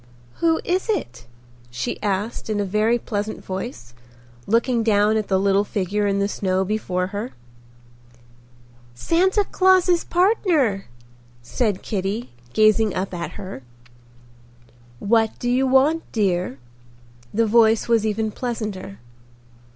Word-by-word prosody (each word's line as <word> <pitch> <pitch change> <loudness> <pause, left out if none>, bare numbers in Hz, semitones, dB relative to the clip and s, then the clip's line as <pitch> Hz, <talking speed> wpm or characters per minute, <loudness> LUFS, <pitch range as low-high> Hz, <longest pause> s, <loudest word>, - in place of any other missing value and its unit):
"Who 330 -1 +2
is 370 +5 -1
it?" 120 - -3 0.4
she 120 +1 -4
asked 205 +3 -2
in 210 -1 0
a 205 - 0
very 215 +4 +2
pleasant 215 -2 -4
voice, 190 - -6 0.5
looking 235 +2 +2
down 215 -1 +3
at 215 -2 -1
the 190 -1 +2
little 200 +1 +3
figure 205 +1 -1
in 200 0 +1
the 200 0 +1
snow 190 -2 -1
before 185 -3 -1
her. 210 +5 -4 1.6
"Santa 375 - +2
Claus's 370 -2 +3
partner," 345 - +1 0.6
said 205 - -1
Kitty, 205 +3 -3 0.2
gazing 215 -1 +3
up 190 +1 -3
at 170 -1 -5
her. 190 -9 -8 1.4
"What 225 - +1
do 245 - -2
you 260 +2 +2
want, 275 +5 +3
dear?" 180 - 0 0.7
The 230 +2 +2
voice 225 0 +4
was 230 -2 +3
even 220 0 -1
pleasanter. 210 - -5
215 Hz, 120 wpm, -22 LUFS, 195-240 Hz, 1.6 s, voice